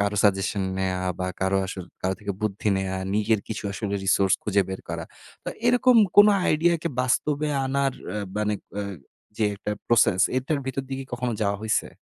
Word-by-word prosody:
কারো 100 0 0
সাজেশন 100 0 +2 0.2
নেয়া 95 -1 0 0.2
বা 90 - -1
কারো 95 +1 +2
আসর 95 -1 -6 0.2
কারো 95 +1 0
থেকে 100 -1 -3
বুদ্ধি 105 0 -1
নেয়া 95 0 -2
বা 95 - -4
নিজের 105 0 +2
কিছু 110 - -4
আসলে 100 0 -3
resource 95 -1 +3
খুঁজে 100 -1 +2
বের 95 - -5
করা। - - -4 0.4
তো - - -3 0.2
এরকম 245 0 +5 0.2
কোন 205 - +10 0.2
আইডিয়া 170 +3 +3
কি 170 - 0
বাস্তবে 145 +4 +1 0.2
আনার 135 0 +1 0.2
আ - - -2 0.2
বানেক 105 -1 -1
অ্যা 100 0 -2 0.5
যে 110 - +1
একটা 100 +1 -5 0.2
process 110 -5 +4 0.2
এটার 140 +3 0
ভিতর 135 +1 -2
দিকে 135 0 -4
কখনো 125 0 -2
যাওয়া 100 -1 +1
হইছে? 110 -1 +1
105 Hz, 185 wpm, -25 LUFS, 95-135 Hz, 0.5 s, কোন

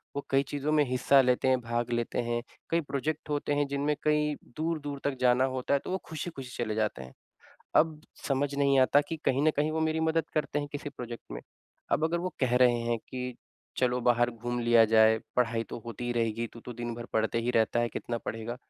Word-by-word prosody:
वो 140 - -3
कई 135 +1 +3
चीज़ों 145 +2 -2
में 150 -1 +4
हिस्सा 130 +2 +5
लेते 125 0 +2
हैं, 130 -1 +4
भाग 120 +1 -2
लेते 120 0 -1
हैं। 120 0 0 0.3
कई 165 0 +2
प्रोजेक्ट 150 +2 -3
होते 145 0 0
हैं 145 -1 +1
जिनमें 140 +2 0
कई 150 0 +2 0.2
दूर-दूर 155 -3 -2
तक 140 -1 0
जाना 125 +1 +4
होता 130 +2 -1
है, 140 - +4
तो - - -7
वो 190 - +1
खुशी-खुशी 150 -5 -6
चले 110 -2 -3
जाते 105 -11 -1
हैं। 65 - -12 0.6
अब 155 -1 +3 0.3
समझ 140 +1 0
नहीं 140 -1 +3
आता 130 +3 +5
कि 165 - -3
कहीं 135 +2 +2
न 155 - +5
कहीं 150 +2 +1
वो 160 - -1
मेरी 160 0 +1
मदद 160 0 +1
करते 150 -1 0
हैं, 145 0 -3
किसी 145 0 -4
प्रोजेक्ट 120 -1 -8
में। - - -5 0.5
अब 155 - +2
अगर 170 +2 +1
वो - - -5
कह 125 -1 +2
रहे 125 -1 +5
हैं 115 0 0
कि 125 -1 -4 0.4
चलो 125 -1 +1
बाहर 120 0 +2
घूम 120 +1 -4
लिया 120 -1 +6
जाए, 110 0 +5 0.2
पढ़ाई 115 -2 +2
तो - - -6
होती 120 +1 -6
ही 120 - -1
रहेगी, 115 0 0
तू 115 - -13
तो 125 - -8
दिन 120 0 -4
भर 120 0 -7
पढ़ते 110 +1 +1
ही 120 - 0
रहता 115 0 +2
है, 120 - +1
कितना 120 0 -4
पढ़ेगा? 115 +2 -5
125 Hz, 225 wpm, -29 LUFS, 120-145 Hz, 0.6 s, लिया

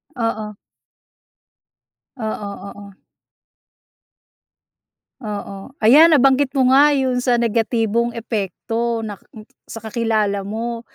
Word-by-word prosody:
Oo. 220 -3 -3 1.6
Oo, 215 -2 -4 0.2
oo. 200 -1 -12 2.3
Oo 200 -2 -7
ayan 290 +10 +6
nabanggit 275 -2 +4
mo 260 - +3
nga 285 +2 +6
yun 260 -3 0
sa 245 -1 +2
negatibong 230 0 0
epekto 225 +1 -3
na 210 - -5 0.6
sa - - -7
kakilala 215 -2 -1
mo. 230 +4 -5
230 Hz, 90 wpm, -19 LUFS, 215-245 Hz, 2.3 s, ayan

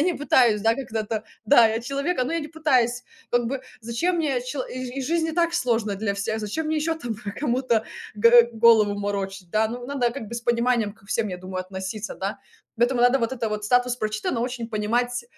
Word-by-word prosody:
я - - +3
не 355 0 +1
пытаюсь, 245 -7 +3
да, 225 0 +4
когда-то, 225 -4 -3
д 220 - -28 0.2
да, 235 0 +7
я- 225 +1 -1
человек, 280 +5 -1
но 270 - -3
я 335 - 0
не 300 - -6
пытаюсь 255 -6 +1 0.3
как 240 -1 +2
бы, 265 +2 -3 0.2
зачем 235 +11 -1
мне, 285 -7 0
чело 260 +1 -3
и 255 +1 -5
жи - - -4
жизнь 330 0 +1
и - - -3
так 340 0 +1
сложно 230 -7 0
для 200 -1 -1
всех, 200 +2 -2
зачем 260 +10 -3
мне 315 0 0
ещё 320 +2 0
там 240 -8 -5
про 205 -1 -7
кому-то 245 -4 0 0.3
г 235 +2 +6
голову 220 -2 +5
морочить, 195 -2 -4
да. 215 +3 +2
Ну 245 +1 -6
надо 270 -4 0
как 225 -6 -7
бы 235 - -7
с 235 - -3
пониманием 235 -2 +1
ко 205 - -24
всем, 220 +1 0
я 180 - -4
думаю, 185 0 -5
относиться, 190 +3 -5
да. 195 +2 -4 0.4
Поэтому, 240 +1 +2
надо 245 +2 +5
вот 230 +1 -1
это 235 -3 -2
вот 210 0 -3
статус 245 +2 +2
"прочитано", 215 +1 -2
очень 240 -1 -3
понимать, 240 +3 -1
235 Hz, 220 wpm, -24 LUFS, 215-260 Hz, 0.4 s, да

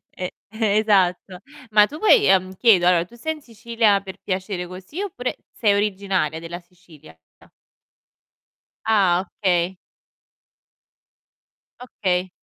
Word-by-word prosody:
E 180 -1 -5 0.2
esatto. 200 -4 +1 0.3
Ma 210 -1 +6
tu 300 - -9
vuoi 430 +4 +5
ehm, 185 0 +2
chiedo, 190 -4 +4
allora 175 -2 +3
tu 235 - -18
sei 315 +7 -3
in 305 - -14
Sicilia 230 -3 0
per 190 -1 -10
piacere 185 -1 -4
così 185 - -8
oppure 290 -11 -4 0.2
sei 210 -3 +1
originaria 195 -5 -1
della 170 +1 -7
Sicilia? 175 - -19 1.7
Ah, 195 -5 +3 0.2
okay. 180 -2 0 2.1
Okay. 185 -6 -2
195 Hz, 110 wpm, -22 LUFS, 180-220 Hz, 2.1 s, Ma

